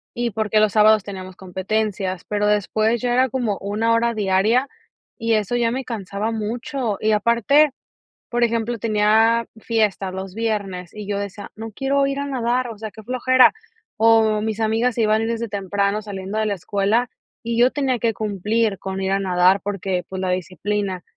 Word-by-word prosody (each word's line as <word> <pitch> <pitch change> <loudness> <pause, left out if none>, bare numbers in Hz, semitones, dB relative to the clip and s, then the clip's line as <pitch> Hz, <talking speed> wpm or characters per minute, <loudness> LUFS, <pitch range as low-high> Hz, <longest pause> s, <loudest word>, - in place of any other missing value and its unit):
y 240 0 -1
porque, 215 0 +1
los 215 -1 +3
sábados 215 -1 +5
teníamos 185 -2 -8
competencias, 190 0 -2
pero 210 0 0
después 215 +2 +1
ya 245 -1 0
era 260 +1 +3
como 235 -6 -1
una 210 +3 -1
hora 235 +1 +2
diaria, 215 +5 +2 0.5
y 230 -1 0
eso 215 +2 +1
ya 235 -1 +1
me 260 +2 -3
cansaba 210 -2 -4
mucho, 230 +1 -3
y 220 - +2
aparte, 235 +8 +3 0.6
por 240 0 +1
ejemplo, 230 0 -1
tenía 225 +2 +3
fiestas 210 -4 0
los 190 0 -6
viernes 200 -6 -3
y 210 -1 -7
yo 200 -1 -1
decía: 200 0 -7
"No 225 +1 -7
quiero 275 +4 +1
ir 275 0 -2
a 280 - -2
nadar, 250 -1 -1
o 225 - -8
sea, 220 +1 -6
qué 220 - -12
flojera". 255 +2 +4 0.4
O 220 -1 +4
mis 220 0 -2
amigas 225 +2 +1
se 235 - 0
iban 220 +1 +2
desde 230 0 -2
temprano 200 +1 -1
saliendo 200 0 -6
de 220 - +1
la 210 - 0
escuela, 200 +6 0 0.3
y 235 0 -2
yo 250 +2 +5
tenía 265 -4 0
que 230 -1 +1
cumplir 210 0 -1
con 190 0 -4
ir 190 0 -1
a 195 - +2
nadar, 185 0 +3
porque, 195 -2 -2
pues, 190 0 -5
la 185 - -1
disciplina. 185 +1 -2
215 Hz, 180 wpm, -21 LUFS, 200-230 Hz, 0.6 s, sábados